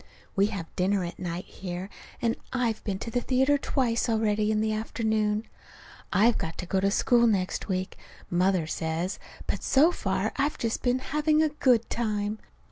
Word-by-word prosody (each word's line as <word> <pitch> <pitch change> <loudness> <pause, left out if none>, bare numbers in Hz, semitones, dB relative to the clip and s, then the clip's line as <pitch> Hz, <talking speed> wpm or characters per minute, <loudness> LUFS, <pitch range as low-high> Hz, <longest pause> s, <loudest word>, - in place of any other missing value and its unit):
We 200 +1 +4
have 195 -6 -6
dinner 190 +1 +1
at 175 - -6
night 175 0 -4
here, 180 0 -6 0.4
and 230 -1 +2 0.2
I've 240 -4 -1
been 200 -3 -2
to 230 +3 -6
the 245 - 0
theater 265 +3 +2
twice 245 -4 0
already 215 -1 +1
in 215 0 +2
the 215 0 +1
afternoon. 215 -1 0 0.7
I've 220 +5 +4
got 160 - -4
to 180 - -5
go 190 +2 0
to 195 +1 +2
school 235 +3 +4
next 190 -4 0
week, 185 -1 -2 0.3
Mother 180 -1 +2
says, 160 +3 -2 0.3
but - - -2
so 300 +6 +5
far - - -1
I've 285 +2 0
just 230 -1 -2
been 245 0 +2 0.2
having 305 +1 +3
a 310 - +2
good 250 -6 +2
time. 215 -2 -1
215 Hz, 175 wpm, -27 LUFS, 190-240 Hz, 0.7 s, so